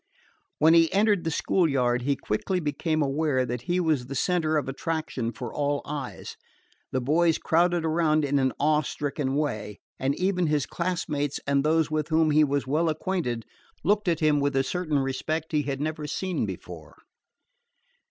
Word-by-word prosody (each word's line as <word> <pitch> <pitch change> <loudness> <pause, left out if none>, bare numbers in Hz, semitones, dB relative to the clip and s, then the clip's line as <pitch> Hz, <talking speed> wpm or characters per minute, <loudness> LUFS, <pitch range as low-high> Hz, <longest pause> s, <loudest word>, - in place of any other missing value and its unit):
When 160 +2 +5
he 165 -1 +5
entered 205 -2 +2
the - - +1
school 165 +2 +1
yard 125 -3 +1
he 140 +3 +1
quickly 180 - -2
became 155 0 -1
aware 140 -2 +1
that 120 0 -4
he 180 +1 +2
was 155 -8 0
the 135 - -6
center 160 +1 +1
of 145 - -1
attraction 135 -4 -3
for 120 +1 -7
all 145 -1 -1
eyes. 145 -3 -6 0.5
The 130 - 0
boys 160 +6 +2
crowded 170 0 +2
around 155 -2 +2
in 140 0 +1
an 130 -1 +2
awe 150 +1 +3
stricken 140 -1 -3
way, 110 -9 -2 0.2
and 135 +2 0
even 180 -2 +1
his 150 -3 +1
classmates 160 -5 -2
and 140 0 +2
those 160 0 +2
with 155 -1 -1
whom 160 -1 +3
he 155 +1 +5
was 140 -1 0
well 155 +5 +1
acquainted 155 - -2 0.4
looked 205 +3 +1
at 165 -2 +1
him 150 -1 +3
with 140 0 0
a 135 - +3
certain 160 -1 -1
respect 140 +4 -2
he 150 -2 +2
had 135 -1 -3
never 155 0 -3
seen 185 +4 -2
before. - - -9
150 Hz, 175 wpm, -26 LUFS, 140-165 Hz, 0.5 s, When